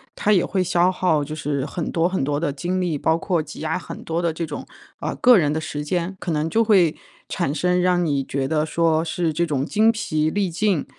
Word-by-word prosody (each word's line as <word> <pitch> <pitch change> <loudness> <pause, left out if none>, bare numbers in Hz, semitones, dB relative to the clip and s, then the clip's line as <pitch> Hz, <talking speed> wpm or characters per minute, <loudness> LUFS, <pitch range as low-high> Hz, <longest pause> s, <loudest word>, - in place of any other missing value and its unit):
它 210 - +1
也 185 -4 +4
会 190 -2 0
消 175 +1 +2
耗 160 -5 +1
就 150 +2 -6
是 145 -3 -2
很 165 +2 -4
多 170 +1 +2
很 185 -6 -1
多 145 +1 0
的 145 -4 -1
精 180 +6 -2
力， 165 -6 -1
包 160 +1 +2
括 170 -2 0
挤 155 - -9
压 160 +3 -1
很 - - -9
多 165 +1 -2
的 170 -1 +1
这 165 +1 -4
种， 150 - -7 0.3
啊， - - -3
个 250 -3 +6
人 150 -2 +1
的 155 - -1
时 150 -1 -5
间。 175 +4 -2
可 170 - -3
能 150 0 0
就 225 +7 +2
会 185 -7 +4 0.3
产 150 -6 -1
生， 180 +3 +1
让 180 -1 +2
你 140 -3 0
觉 135 0 -2
得 155 +1 +1
说 160 0 +1
是 165 -1 -1
这 170 +3 0
种 140 -3 -1
精 220 +5 +3
疲 155 -8 -1
力 195 -1 -1
尽， 185 -2 0
165 Hz, 255 characters per minute, -22 LUFS, 150-180 Hz, 0.3 s, 个